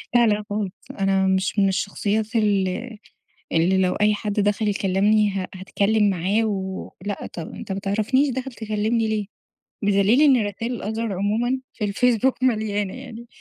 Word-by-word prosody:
لا، 240 -1 +6
لا 210 0 +1
خالص، 205 -2 -2 0.3
أنا 195 0 +2
مش 190 +2 +1
من 195 - +4
الشخصيات 205 +4 -1
اللي 210 +2 0 0.6
اللي 175 +4 +3
لو 185 -1 +2
أي 210 0 +3
حد 210 0 -3
دخل 205 +1 +1
يكلمني 205 +2 +2
ه 190 -1 -3
هاتكلم 205 +3 +1
معاه 195 +5 +1
و 190 -3 -3 0.2
لأ، 205 -1 -3
طب 165 -2 -7
أنتَ 195 - -6
ما 190 - -3
تعرفنيش 215 +8 +1
داخل 260 +1 -4
تكلمني 220 +1 -1
ليه؟! 215 -2 -1 0.6
بدليل 205 +6 +4
إن 260 -8 +5
رسايل 230 +4 -4
الOther 220 +2 -3
عمومًا 220 +7 0
في 215 - -4
الفيسبوك 245 +4 +1
مليانة 215 -5 0
يعني 235 +1 -9
210 Hz, 155 wpm, -23 LUFS, 195-225 Hz, 0.6 s, لا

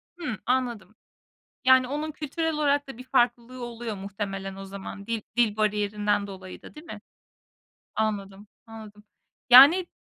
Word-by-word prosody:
Hıı. 300 -11 -5
Anladım. 240 -4 -2 0.7
Yani 260 -1 +5
onun 300 +2 -3
kültürel 315 +2 -3
olarak 285 -2 +1
da 250 - -9
bir 255 - -9
farklılığı 245 -1 0
oluyor 230 -2 -6
muhtemelen 195 -1 -5
o 195 - -8
zaman 200 +1 -9
dil 230 -1 -2 0.2
dil 220 -3 +2
bariyerinden 210 -1 0
dolayı 185 -2 -10
da, - - -13
değil 305 +3 -13
mi? - - -9 0.9
Anladım, 205 -2 -3 0.2
anladım. 215 -2 -12 0.5
Yani, 300 +9 +9
225 Hz, 140 wpm, -26 LUFS, 205-260 Hz, 0.9 s, Yani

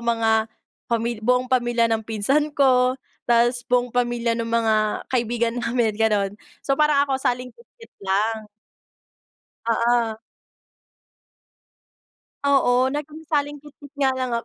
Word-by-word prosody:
mga 225 -1 +1 0.4
pamil 235 -1 -1
buong 250 +2 +1
pamilya 240 -2 +2
ng 225 - +1
pinsan 265 +8 0
ko, 255 -2 +3 0.3
ta's 240 +1 +3
buong 245 -1 +1
pamilya 240 -1 0
ng 230 0 -3
mga 230 -1 +2 0.4
kaibigan 235 -1 0
namin 230 -2 0
gano'n. 210 -3 +1 0.3
So, 275 -1 +1
parang 300 -2 +3
ako 270 - +1
salingkit 250 - -3
kit 460 - -15
lang. 215 +3 0 1.3
Oo. 230 -1 +1 2.3
Oo, 260 -2 +3
naging 300 +2 -6
salingkit 295 -1 -3
kit 285 0 -13
nga 270 -2 +2
lang 255 -1 -3
ako. 230 - -4
240 Hz, 120 wpm, -23 LUFS, 230-265 Hz, 2.3 s, ko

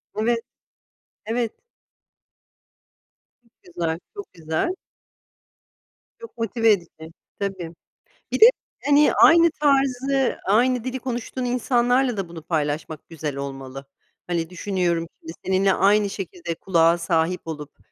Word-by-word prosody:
Evet, 230 +2 +1 0.9
evet. 230 +1 -1 1.9
Çok 230 - -32 0.2
güzel, 165 -1 -1 0.2
çok 405 -1 -9
güzel. 160 - -2 1.5
Çok 460 - -12
motive 225 0 +2
edici, 165 -4 -3 0.3
tabii. 190 -4 -4 0.6
Bir - - -1
de, 445 - +11 0.4
hani, 290 +1 +5
aynı 335 0 +7
tarzı, 270 -2 +2
aynı 240 +4 +2
dili 260 0 -3
konuştuğun 250 0 -4
insanlarla 245 0 +1
da 195 -3 -3
bunu 170 -2 -9
paylaşmak, 155 -1 -3
güzel 150 -3 -5
olmalı. 135 -1 -7 0.4
Hani, 170 -1 -2
düşünüyorum 180 -2 -1
şimdi, 160 - -8
seninle 190 +1 +2
aynı 205 +1 +3
şekilde 180 -3 -5
kulağa 170 -1 +2
sahip 170 +1 0
olup, 150 -2 -7
195 Hz, 110 wpm, -23 LUFS, 165-245 Hz, 1.9 s, de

